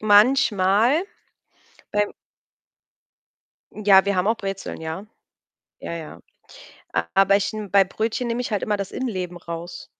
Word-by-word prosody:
Manchmal, 215 - +4 0.9
beim 210 0 0 1.6
Ja, 200 -2 +5
wir 200 0 0
haben 180 +2 +1
auch 225 - +2
Brezeln, 195 -4 -5
ja. 160 +6 -5 0.7
Ja, - - -6
ja. 160 -2 -8 1.0
Aber 195 0 +5
ich 205 +2 -1
n 215 -2 -6
bei 200 -1 +6
Brötchen 225 +5 -2
nehme 235 +1 -1
ich 245 - -3
halt 205 - 0
immer 210 -1 0
das 200 -1 -5
Innenleben 185 -8 -3
raus. 170 0 -7
200 Hz, 130 wpm, -23 LUFS, 185-220 Hz, 1.6 s, bei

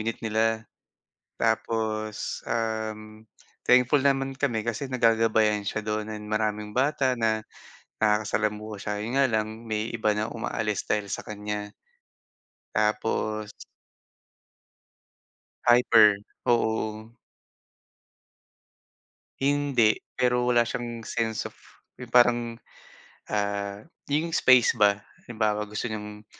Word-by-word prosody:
unit 115 +1 -2
nila. 110 +1 +1 0.8
Tapos, 110 -1 -1
um, 110 -1 -3 0.4
thankful 125 +3 +4
naman 135 -1 +1
kami 120 -6 0
kasi 130 +4 -3
nagagabayan 110 -3 +3
siya 110 +2 -2
do'n 110 0 -2
and 105 0 -7
maraming 105 0 -2
bata 135 -1 +2
na, 110 -2 0 0.5
nakakasalamuha 105 0 0
siya. 105 - -3
'Yon 115 - -4
nga 135 - +5
lang, 110 -2 0 0.2
may 110 +1 -2
iba 110 -2 0
na 105 +1 -2
umaalis 110 -2 -3
dahil 105 -2 -1
sa - - -4
kaniya. 105 0 -5 1.0
Tapos 110 0 0 2.1
Hyper. 115 -4 +6 0.3
Oo, 110 -1 0
o - - -35 2.2
Hindi. 140 -5 +3 0.2
Pero 125 -1 +2
wala 120 -1 +4
siyang 120 -1 -5
sense 110 -2 -2
of - - -7 0.5
'yong 125 - -8
parang, 120 -1 +6 0.9
ah, 100 0 -2 0.2
'yong 160 +3 0
space 125 -2 +5
ba. 105 -2 +4 0.3
Halimbawa, 105 -2 -1
gusto 105 - -4
niyang, 105 -1 -6
110 Hz, 105 wpm, -26 LUFS, 105-120 Hz, 2.2 s, Hyper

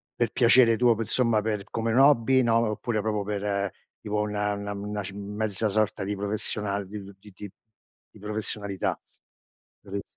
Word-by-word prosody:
per - - 0
piacere 115 -1 +5
tuo, 120 -1 +4
per 110 -1 -3
somma 115 -3 +2
per 105 -2 -2
come 115 0 -1
un 120 - +3
hobby, 130 -2 +5
no, 115 -2 +2
oppure 110 0 -2
proprio 105 -1 -1
per 100 -1 -2 0.3
tipo 105 0 -1
una 105 0 -1
una 100 0 -5
una 105 0 -4
ci 95 - -7
m 100 +1 -7
mezza 110 0 -1
sorta 105 -1 0
di 100 +1 -2
professional 100 -1 -2
di 105 0 -7
di 100 - -11
ti 105 +1 -15
ti 100 +1 -9 0.6
di - - -17
professionalità? 105 -1 -3 0.8
Capit 100 0 -5
105 Hz, 175 wpm, -26 LUFS, 100-110 Hz, 0.8 s, piacere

